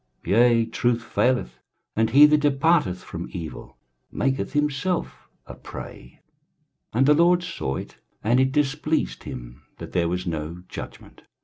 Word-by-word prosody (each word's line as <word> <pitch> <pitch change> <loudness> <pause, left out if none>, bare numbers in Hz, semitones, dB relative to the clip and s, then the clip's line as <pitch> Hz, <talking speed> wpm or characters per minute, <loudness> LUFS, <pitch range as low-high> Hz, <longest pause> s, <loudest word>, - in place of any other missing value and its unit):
23:059:015 - - -3
Yea, 120 -1 +5
truth 120 +1 0
faileth; 125 - 0 0.4
and 110 0 +2
he 140 +6 +8
that 150 0 +4
departeth 145 - +2
from 85 0 -7
evil 80 -4 -8 0.3
maketh 135 0 -1
himself 150 +4 -1 0.2
a - - -9
prey: 60 +1 -10 0.7
and 125 +4 +2
the 150 - +6
LORD 175 +3 +4
saw 115 - -3
it, - - -7 0.3
and 120 +4 +3
it 130 0 +3
displeased 150 +2 -1
him - - -8 0.2
that - - -9
there 85 -2 +1
was 90 +1 -2
no 85 +1 -4
judgment. - - -10
125 Hz, 145 wpm, -24 LUFS, 90-150 Hz, 0.7 s, he